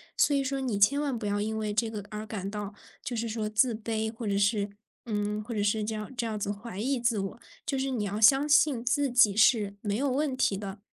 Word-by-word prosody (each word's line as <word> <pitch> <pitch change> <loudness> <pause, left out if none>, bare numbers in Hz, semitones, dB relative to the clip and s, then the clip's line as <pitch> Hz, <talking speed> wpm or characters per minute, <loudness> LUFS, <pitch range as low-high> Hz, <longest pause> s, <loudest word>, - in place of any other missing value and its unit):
所 290 - +3
以 275 - +1
说 270 0 -2
你 245 -6 -1
千 240 +9 +4
万 280 -4 -1
不 225 - -6
要 205 0 0
因 220 +1 -2
为 215 -1 -2
这 225 +2 +1
个 210 -3 -6
而 215 0 -6
感 200 -2 -5
到 205 -1 -5 0.3
就 245 - -4
是 230 0 -2
说 215 -1 -2
自 230 +3 +3
卑， 220 0 -3
或 225 -1 -6
者 200 -1 +1
是 200 0 +1 0.4
嗯， 210 -1 -2
或 235 +2 -6
者 210 - -1
是 210 +1 +1
这 220 +1 -3
样 215 +1 -5
这 240 - -1
样 215 -2 -3
子 200 0 -2
怀 205 0 -7
疑 260 +4 0
自 235 -3 +1
我， 195 +4 -5 0.2
就 275 - -2
是 265 0 -1
你 225 -5 -1
要 205 +1 -3
相 270 +7 +5
信 280 -4 +4
自 270 +2 +1
己 215 -5 +5
是 215 -3 +4
没 205 -1 -1
有 275 +5 0
问 275 +1 0
题 200 -6 +1
的， 195 0 -7
220 Hz, 275 characters per minute, -28 LUFS, 205-250 Hz, 0.4 s, 相